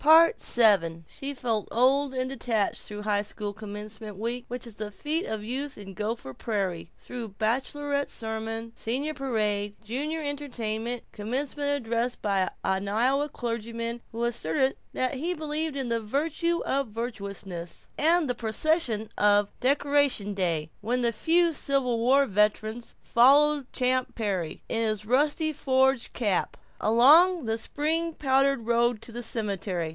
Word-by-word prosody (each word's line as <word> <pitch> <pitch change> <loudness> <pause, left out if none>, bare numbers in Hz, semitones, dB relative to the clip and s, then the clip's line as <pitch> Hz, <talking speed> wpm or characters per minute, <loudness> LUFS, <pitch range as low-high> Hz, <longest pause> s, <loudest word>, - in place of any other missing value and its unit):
VII 220 - +5
She 280 +1 -6
felt 230 -5 -1
old 265 +3 +3
and 255 0 0
detached 235 -6 -1
through 210 0 -6
high 205 -1 +1
school 205 0 -5
commencement 210 0 -8
week, 235 +3 -3
which 245 0 -5
is 235 - -10
the 210 0 -5
fete 305 - -3
of 220 -1 -3
youth 265 +5 -4
in 195 -2 -9
Gopher 210 - -4
Prairie; 190 - -3
through 240 -3 -7
baccalaureate 280 +5 -1
sermon, 225 0 -4
senior 265 +8 -2
Parade, 210 -7 -1
junior 295 +8 -3
entertainment, 245 -5 -3
commencement 270 +7 -3
address 240 -3 0
by 195 -3 0
an 190 +1 0
Iowa 260 +8 +2
clergyman 230 -1 -4
who 230 +1 -3
asserted 240 +1 +1 0.2
that 255 +2 0
he 330 +7 -2
believed 310 -1 -2
in 265 -3 -2
the 230 -1 0
virtue 320 +9 0
of 275 0 0
virtuousness, 200 -6 -6
and 325 +1 +4
the 250 - 0
procession 235 0 +1
of 205 0 +4
Decoration 280 -5 +2
Day, 165 -5 -1
when 245 +4 0
the 235 -1 +2
few 335 +7 +3
Civil 270 -5 0
War 265 +4 +4
veterans 215 +2 0
followed 280 +3 +4
Champ 255 0 0
Perry, 190 -8 -2
in 225 - -1
his 215 -2 -1
rusty 295 +6 +2
forage 265 -2 +2
cap, 205 -6 -1 0.3
along 300 - +6
the 225 0 0
spring 320 +6 -1
powdered 270 -3 +2
road 235 0 +2
to - - -9
the 240 +1 -5
cemetery. 200 -7 -2
235 Hz, 140 wpm, -27 LUFS, 210-275 Hz, 0.3 s, along